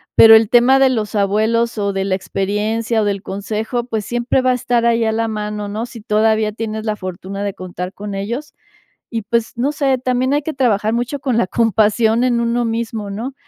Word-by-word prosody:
pero 225 0 +9
el 220 -1 +4
tema 250 +2 +5
de 270 -1 +5
los 220 -4 -2
abuelos 220 +3 +1
o 200 -1 -1
de 195 0 -1
la 190 -1 0
experiencia 215 +4 -1
o - - -1
del 200 -2 -1
consejo, 215 +5 -3
pues 220 -4 -4
siempre 240 +2 0
va 255 0 +2
a - - +3
estar 240 -1 0
ahí 230 -1 +2
a 220 - +1
la 225 +1 -1
mano, 210 -1 -4
¿no?, 215 +3 -4
si 235 -2 -11
todavía 215 0 +1
tienes 220 0 -5
la 215 -1 -1
fortuna 190 +1 -6
de 200 -1 -2
contar 180 0 -7
con 205 0 -6
ellos, 235 +10 -5 0.5
y 225 -3 -3
pues, 230 +2 -1
no 280 +5 0
sé, 270 -3 +1
también 255 +1 0
hay 290 - +1
que 315 - -3
trabajar 220 -5 +1
mucho 245 +4 -2
con 260 -4 -1
la 210 - +3
compasión 225 +1 +2
en 245 -2 +2
uno 235 +1 0
mismo, 225 -2 -3
¿no?, 230 +7 -5
225 Hz, 215 wpm, -18 LUFS, 210-240 Hz, 0.5 s, pero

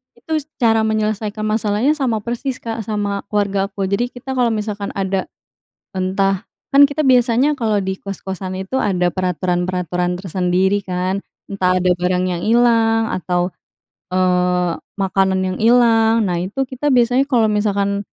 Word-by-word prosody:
Itu 315 -2 -2
s 290 - -12
cara 225 -2 +2
menyelesaikan 215 0 -2
masalahnya 215 +4 +1
sama 255 -8 -1
persis, 240 +3 -3
Kak, 230 0 -4
sama 205 -2 -2
keluargaku. 200 -1 -1
Jadi 240 +5 +1
kita 245 +2 -7
kalau 250 -3 +2
misalkan 210 -2 -3
ada, 195 -1 -1 0.7
entah 190 +1 0 0.3
kan 280 - +8
kita 300 0 -1
biasanya, 250 +3 +3
kalau 225 -6 0
di 190 -1 -2
kos-kosan 190 -1 -5
itu, 195 +8 -2
ada 180 -3 +1
peraturan-peraturan 180 -1 -1
tersendiri, 185 +2 0
kan. 185 +1 -2 0.2
Entah 185 -2 +1
ada 180 0 +1
barang 180 +1 0
yang 175 -2 -2
hilang 225 0 +3
atau, 180 0 -1 0.5
eee, 180 -1 +1 0.2
makanan 190 -1 +1
yang 185 0 -3
hilang. 225 -1 +4
Nah, 175 -2 -1
itu, 200 +10 -2
kita 265 +2 -3
biasanya 250 +1 +3
kalau 225 -5 +2
misalkan 200 -1 0
200 Hz, 140 wpm, -19 LUFS, 185-230 Hz, 0.7 s, kan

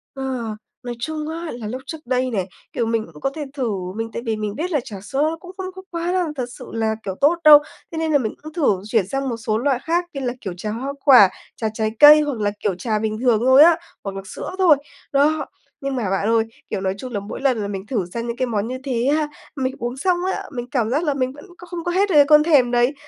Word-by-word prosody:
Ờ, 255 -5 -3 0.3
nói 245 -1 -5
chung 305 +4 -3
á 335 +1 -5
là 235 -3 -6
lúc 255 +4 -5
trước 320 - -6
đây 255 +1 0
này, 190 -5 -1 0.3
kiểu, 235 - 0
mình 225 -1 0
cũng 150 - -14
có - - +1
thể 305 -2 -4
thử, 260 -5 -1 0.3
mình 225 +1 -3
tại - - -4
vì 225 -1 0
mình 210 -1 -4
biết 345 +5 -3
là 300 - +2
trà 210 - -8
sữa 290 +9 0
cũng 360 +1 -11
không 375 -1 -5
có 375 - -8
quá 340 0 -2
là, 365 -1 +1
thật 255 -3 -2
sự 250 - -8
là, 220 -1 0
kiểu, 190 -2 -4
tốt 295 +5 +5
đâu, 300 -1 +10 0.3
thế 325 - -6
nên 320 -1 0
là 295 - +5
mình 225 -6 -2
cũng 310 0 -9
thử 270 - +1
chuyển 215 -3 +1
sang 270 +3 -2
một 235 - -3
số 220 -1 -1
loại 260 +1 +1
khác 345 +2 0
như 275 - -4
là, 245 -2 -1
kiểu, 190 - -4
trà 210 +3 -4
hoa 260 +6 -4
quả, 250 -9 +8 0.3
trà 220 - -2
trái 220 -1 -1
cây, 300 +1 +10
hoặc 290 -6 -2
là, 205 -1 +1
kiểu, 200 -3 -1
trà 215 +3 -1
bình 215 0 -2
thường 240 -4 +3
thôi 260 +3 +8
á, 335 0 +6 0.3
hoặc 195 -1 -5
là 195 - -4
sữa 190 - -6
thôi. 350 -6 +6 0.3
Đó, 290 +1 +2 0.4
nhưng 275 -1 -2
mà 225 -7 -1
bạn 195 +2 0
ơi, 225 0 +3 0.3
kiểu, - - -3
nói 190 -1 0
chung 250 +3 -7
là 205 - -1
mỗi 200 +5 -7
lần 265 -3 +2
là 200 - -2
mình 195 -1 -5
thử 215 -5 -1
sang 235 0 -3
những 235 0 -4
cái 255 - +1
món 215 -2 -1
như 255 +1 -4
thế 250 -3 -1
há, 310 -1 0 0.3
mình 260 -2 -1
uống 240 +2 -4
xong 360 +5 +1 0.2
á, - - -4
mình 245 -3 -4
cảm 235 -5 +1
giác 290 +7 +1
là 295 -4 +1
mình 260 -2 -1
vẫn 290 - -13
có 360 - -12
không 345 -1 -6
có 350 - -1
hết 395 +3 +2
được 350 - +1
cái 290 -1 +8
cơn 300 +1 +6
thèm 285 -7 +4
đấy. 245 +3 +3
255 Hz, 280 wpm, -21 LUFS, 220-300 Hz, 0.4 s, đâu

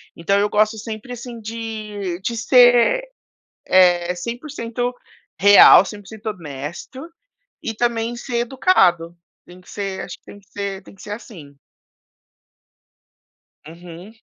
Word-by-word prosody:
Então 200 +4 0
eu 205 - +1
gosto 215 +1 +1
sempre 225 +3 -7
assim 240 -1 -9
de 215 -4 -6
de 235 +4 -3
ser, 245 - +4 0.6
eh, 180 -1 +3
100% 245 - -5 0.5
real, 200 -1 +8
100% 210 +2 -11
honesto 170 - -7 0.5
e 225 - -4
também 235 +1 -1
ser 240 0 -5
educado. 180 - +2 0.3
Tem 180 +1 -15
que 180 - -20
ser, 195 -2 -5
acho - - -8
que - - -67
tem 205 - -13
que 200 - -27
ser 200 -1 -5
tem - - -16
que - - -17
ser 205 - -9
assim. 170 - -10 2.1
Uhum. 175 +5 -12
210 Hz, 125 wpm, -20 LUFS, 180-235 Hz, 2.1 s, real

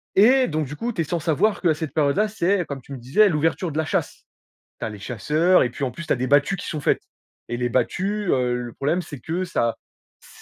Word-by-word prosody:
et 250 +6 +6
donc 155 -1 -1
du 150 - -7
coup 235 +1 -3
tu 170 - -1
es - - +2
sans 170 +2 -2
savoir 170 +7 +1
qu'à 165 -4 +3
cette 155 -2 -5
période 145 -3 +2
là 215 +2 +2
c'est, 195 -3 +1
comme 140 -2 -6
tu 140 - -11
me - - -5
disais, 135 - +3
l'ouverture 165 +1 0
de 150 - -5
la 160 - +2
chasse. - - -2 0.6
Tu - - -3
as - - -4
les 105 - -9
chasseurs 150 - +2
et 125 - 0
puis 135 - -4
en 130 - -1
plus 170 +6 -8
tu - - +2
as - - +1
des 130 +1 -1
battues 145 +8 +3
qui - - -7
sont 155 - -3
faites. - - +1 0.5
Et 120 - -2
les 125 0 -1
battues, 195 - -1
heu, 125 -1 +1
le 120 -1 -5
problème 150 +6 0
c'est 145 -5 -9
que 170 +7 -2
ça 115 -9 0 0.4
c - - -19
155 Hz, 265 wpm, -23 LUFS, 130-185 Hz, 0.6 s, et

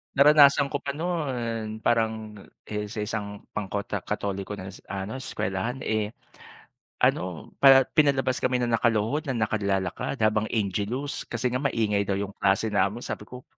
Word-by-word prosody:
Naranasan 140 -1 +6
ko 145 - -1
pa 140 0 -4
noon, 120 -10 -3
parang, 110 -2 0 0.2
eh, 105 0 -4
sa 105 0 -4
isang 105 -1 -5
pangkota 100 0 -3
Katoliko 100 0 -3
na, 95 -1 -8 0.2
ano, 100 +6 -4
eskuwelahan 120 0 -3
,eh, 110 0 -1 0.9
ano, - - 0
pa 135 -1 +8
pinalabas 135 -4 +2
kami 125 -1 +1
ng 120 - 0
nakaluhod 115 +6 +1
na 130 - -1
nakad 110 -1 0
lalakad 95 +3 -1
habang 110 0 +2
Angelus 110 +6 -2
kasi 125 - -1
nga 125 - 0
maingay 110 -7 0
daw 100 - +1
yung 100 0 -3
klase 100 +3 +2
namin, 100 +4 +1
sabi - - -5
ko, 125 0 -10
110 Hz, 150 wpm, -26 LUFS, 100-130 Hz, 0.9 s, pa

